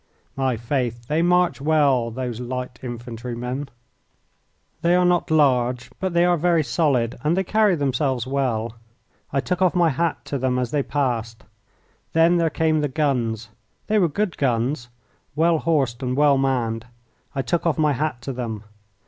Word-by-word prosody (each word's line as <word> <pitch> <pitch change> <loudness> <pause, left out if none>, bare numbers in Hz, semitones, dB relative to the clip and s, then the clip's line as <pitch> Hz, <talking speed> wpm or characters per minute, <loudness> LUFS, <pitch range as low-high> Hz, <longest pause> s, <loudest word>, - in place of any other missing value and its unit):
My 130 -3 0
faith, 120 0 -2
they 155 +2 +1
march 180 -3 +2
well, 140 -6 +3
those 120 -1 -4
little 125 +1 -3
infantrymen! 125 +2 -5 1.1
They 170 +1 +3
are 180 0 +3
not 175 0 +2
large, 125 -6 +2
but 190 -2 -2
they 170 +1 +5
are 175 -1 +3
very 170 0 +2
solid 130 -3 +1
and 160 +4 +1
they 190 - +2
carry 210 0 +3
themselves 135 -3 0
well. 125 -5 -1 0.6
I 135 - +1
took 180 +5 -2
off 185 -1 +3
my 170 -3 +4
hat 165 +4 -1
to 140 - -3
them 130 0 0
as 125 -1 -1
they 145 - +1
passed. 120 -6 -2 0.7
Then 165 +2 +4
there 165 -1 +2
came 160 0 +1
the 145 - +1
guns. 125 -7 -1 0.4
They 215 0 +2
were 175 -4 +3
good 200 +4 -2
guns, 120 0 0 0.5
well 165 +1 +3
horsed 140 -8 0
and 125 0 -2
well 145 -2 +4
manned. 120 -4 -1 0.5
I 135 - -1
took 170 +5 0
off 160 - +1
my 150 -2 +3
hat 135 -2 -2
to 135 - -4
them. 115 -4 -5
135 Hz, 165 wpm, -23 LUFS, 120-165 Hz, 1.1 s, they